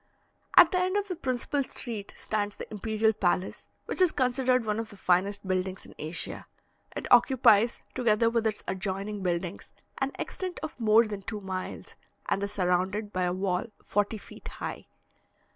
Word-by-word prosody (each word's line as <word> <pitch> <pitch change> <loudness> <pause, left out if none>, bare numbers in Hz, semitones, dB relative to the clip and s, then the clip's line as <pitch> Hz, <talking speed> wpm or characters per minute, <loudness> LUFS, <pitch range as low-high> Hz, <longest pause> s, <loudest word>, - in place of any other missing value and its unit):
At 350 -2 +9
the 365 - +2
end 370 +2 +1
of 410 0 -1
the 365 - -2
principal 275 -1 -1
street 225 -6 -6
stands 205 -1 -2
the - - -7
imperial 220 +1 +1
palace, 185 -1 -1 0.2
which - - 0
is 360 -3 +6
considered 255 -1 +2
one 210 0 0
of 225 - -4
the 205 - -12
finest 190 +2 +1
buildings 185 0 -1
in - - -13
Asia. 155 +3 -4 0.5
It - - -4
occupies, 235 -3 +5
together 230 -2 +3
with 230 -1 +2
its 215 -1 -3
adjoining 195 +2 -3
buildings, 175 0 -3 0.3
an 270 0 0
extent 370 -2 -4
of 290 - -6
more 225 0 +5
than 205 -2 -5
two 210 +2 -5
miles, 190 -1 -5 0.3
and 195 - 0
is 200 0 -2
surrounded 190 +2 0
by 185 -1 +1
a 175 - +1
wall 185 +2 -1
forty 205 +2 0
feet - - -12
high. - - -6
210 Hz, 170 wpm, -28 LUFS, 190-245 Hz, 0.5 s, At